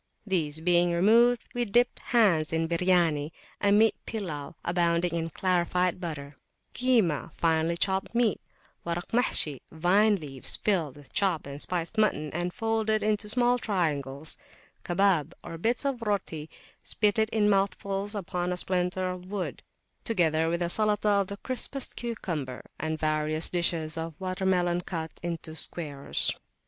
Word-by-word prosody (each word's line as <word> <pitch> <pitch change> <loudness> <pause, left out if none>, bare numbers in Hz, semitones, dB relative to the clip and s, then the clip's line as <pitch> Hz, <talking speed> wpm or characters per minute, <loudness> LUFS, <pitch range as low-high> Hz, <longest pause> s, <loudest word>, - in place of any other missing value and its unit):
These 160 -6 -1
being 175 0 +3
removed, 230 +7 +4
we 245 - 0
dipped 240 +3 +2
hands 190 -10 +2
in 165 0 0
Biryani, 170 -4 +2 0.3
a 200 - +3
meat 215 +2 +5
pillaw, 170 -9 -5
abounding 170 0 +1
in 165 -1 -2
clarified 180 +1 0
butter; 150 -4 -6 0.4
Kimah, 225 - +1
finely 165 0 +1
chopped 190 +4 -1
meat; 235 -4 +2 0.4
Warak 170 +2 -4
Mahshi, 160 - +2
vine 195 +6 +3
leaves 140 -7 -3
filled 165 -10 0
with 145 -2 -16
chopped 190 -6 +1
and 140 +1 -7
spiced 180 +4 -2
mutton, 155 -9 +1
and 175 +2 -2
folded 220 -1 0
into 210 0 0
small 245 +2 +3
triangles; 155 - -2 0.5
Kabab, 175 -4 +2
or 165 - -7
bits 235 - 0
of 270 -4 -1
roti 190 -8 -2 0.3
spitted 220 +1 +1
in 215 -2 +2
mouthfuls 200 +1 0
upon 180 -2 -2
a 180 - -2
splinter 185 0 0
of 180 0 -9
wood; 200 -2 -4 0.4
together 165 -6 +1
with 170 +1 0
a 170 - -1
Salatah 210 0 +3
of 195 - -3
the 200 - -6
crispest 260 +3 -3
cucumber, 170 - -4
and 160 +1 -2
various 155 0 0
dishes 165 -2 0
of 160 -1 -6
water 190 0 -2
melon 175 -1 +2
cut 165 -3 -5
up - - -24
into 165 -2 -5
squares. 150 -3 0
180 Hz, 145 wpm, -28 LUFS, 160-210 Hz, 0.5 s, meat